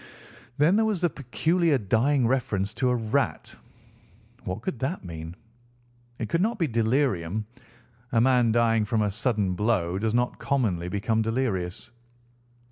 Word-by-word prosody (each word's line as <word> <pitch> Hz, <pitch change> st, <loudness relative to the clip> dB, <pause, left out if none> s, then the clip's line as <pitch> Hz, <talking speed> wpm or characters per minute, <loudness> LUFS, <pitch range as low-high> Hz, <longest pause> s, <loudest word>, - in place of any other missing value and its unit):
Then 155 Hz, +7 st, +4 dB
there 220 Hz, -, +3 dB
was 210 Hz, -5 st, -1 dB
the 175 Hz, -3 st, +2 dB
peculiar 160 Hz, +4 st, +1 dB
dying 120 Hz, +5 st, +2 dB
reference 110 Hz, -5 st, 0 dB
to 125 Hz, +3 st, 0 dB
a 125 Hz, -, +2 dB
rat. 110 Hz, -2 st, -1 dB, 0.9 s
What 90 Hz, +5 st, -4 dB
could 120 Hz, -, -3 dB
that 135 Hz, -, -3 dB
mean? 80 Hz, 0 st, -7 dB, 0.8 s
It 115 Hz, -, -3 dB
could 165 Hz, +11 st, 0 dB
not 225 Hz, +4 st, 0 dB
be 170 Hz, -, +1 dB
delirium. 110 Hz, -, 0 dB, 0.7 s
A 115 Hz, -, +3 dB
man 125 Hz, -1 st, +4 dB
dying 115 Hz, -1 st, +3 dB
from 110 Hz, 0 st, 0 dB
a 105 Hz, -, 0 dB
sudden 105 Hz, -3 st, 0 dB
blow 95 Hz, -3 st, 0 dB
does 110 Hz, +2 st, 0 dB
not 125 Hz, 0 st, 0 dB
commonly 100 Hz, -11 st, 0 dB
become 110 Hz, +4 st, 0 dB
delirious. 110 Hz, -3 st, -2 dB
115 Hz, 145 wpm, -26 LUFS, 100-130 Hz, 0.9 s, Then